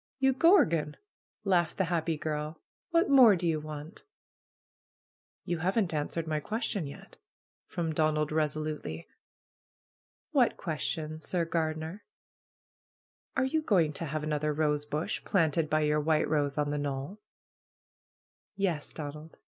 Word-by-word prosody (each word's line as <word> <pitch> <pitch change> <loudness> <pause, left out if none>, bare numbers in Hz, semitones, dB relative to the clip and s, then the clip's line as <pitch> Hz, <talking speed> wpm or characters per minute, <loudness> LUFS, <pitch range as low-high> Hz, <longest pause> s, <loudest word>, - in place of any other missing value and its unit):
"You 265 -1 +3
gorgon 170 - +4 0.2
!" - - -81
laughed 175 -5 +2
the 190 - +2
happy 165 -2 0
girl. 150 +1 -3 0.3
"What 335 -1 +3
more 255 -7 +8
do 175 -1 -2
you 160 -2 +1
want?" 155 +4 -8 1.4
"You 175 -3 -2
haven't 190 +1 +1
answered 155 +2 -2
my 155 -1 -1
question 205 - -2
yet," 140 - -12 0.5
from 165 -2 -2
Don 155 0 +2
ald 150 0 0
resolutely. 155 - -2 1.2
"What - - +3
question, 155 0 -3
Sir 170 +1 0
Gardener?" 160 +3 -2 1.3
"Are 260 - +3
you 315 +4 +1
going 175 - +2
to 165 - -2
have 155 0 -3
another 150 0 0
rosebush 150 0 -1
planted 160 -4 +1
by 155 0 +2
your 150 0 +2
white 155 0 +2
rose 145 -2 0
on 145 -1 +1
the 145 - -1
knoll?" 145 +7 -4 1.4
"Yes, 180 -7 -1
Donald!" 150 +1 -7
155 Hz, 135 wpm, -30 LUFS, 150-175 Hz, 1.4 s, more